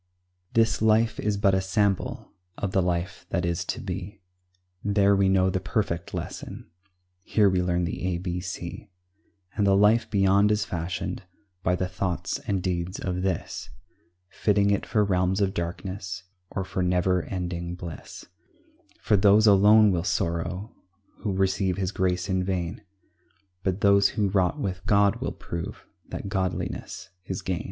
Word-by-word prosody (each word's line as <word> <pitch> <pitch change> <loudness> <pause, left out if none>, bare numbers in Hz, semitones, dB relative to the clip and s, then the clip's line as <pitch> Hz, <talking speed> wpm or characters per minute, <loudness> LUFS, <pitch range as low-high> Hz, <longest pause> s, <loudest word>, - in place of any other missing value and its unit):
This 115 -1 +3
life 110 +1 +3
is 105 -1 0
but 100 -1 +3
a 95 - +2
sample 95 0 -1 0.2
Of 100 - -2
the 95 - +2
life 90 +1 -2
that 90 -1 0
is 85 -1 -1
to - - -3
be; 95 +2 -6 0.6
There 100 -1 +3
we 95 -1 +3
know 95 0 +3
the 95 - 0
perfect 90 -4 -2
lesson, - - -7 0.5
Here 105 +1 +3
we 95 -2 +2
learn 90 0 0
the 85 - -3
a 90 -2 0
b 90 0 -3
c; 90 0 -6 0.7
And 100 - +2
the 95 0 +5
life 110 +3 +4
beyond 100 +1 +4
is 105 0 +1
fashioned 85 0 -3 0.4
By 90 0 +1
the 90 0 -1
thoughts 90 -1 -2
and 100 -4 0
deeds 90 0 -2
of 90 -1 -2
this; 95 -3 -3 0.6
Fitting 100 +2 +2
it 100 - 0
for 105 - +2
realms 95 -1 +1
of 95 -2 +1
darkness, 90 +2 -4 0.3
Or 95 - -3
for 95 - -3
never 90 0 +2
ending 85 -1 -4
bliss; 85 -3 -9 0.8
For 105 - +3
those 100 +2 +5
alone 105 +1 +7
will 85 -2 0
sorrow 85 +2 -2 0.4
Who 105 - -3
receive 95 -1 +1
His 95 -1 -1
grace 90 -3 0
in 95 -1 0
vain, 90 +2 -2 0.8
But 95 +1 -1
those 100 -1 +5
who 105 -2 0
wrought 95 +8 +1
with 95 -7 -3
God 100 -1 +4
will - - -3
prove 85 -1 -6 0.2
That - - -5
godliness 95 -2 -3
is 95 -1 -4
gain. 90 -2 -1
95 Hz, 160 wpm, -26 LUFS, 90-100 Hz, 0.8 s, alone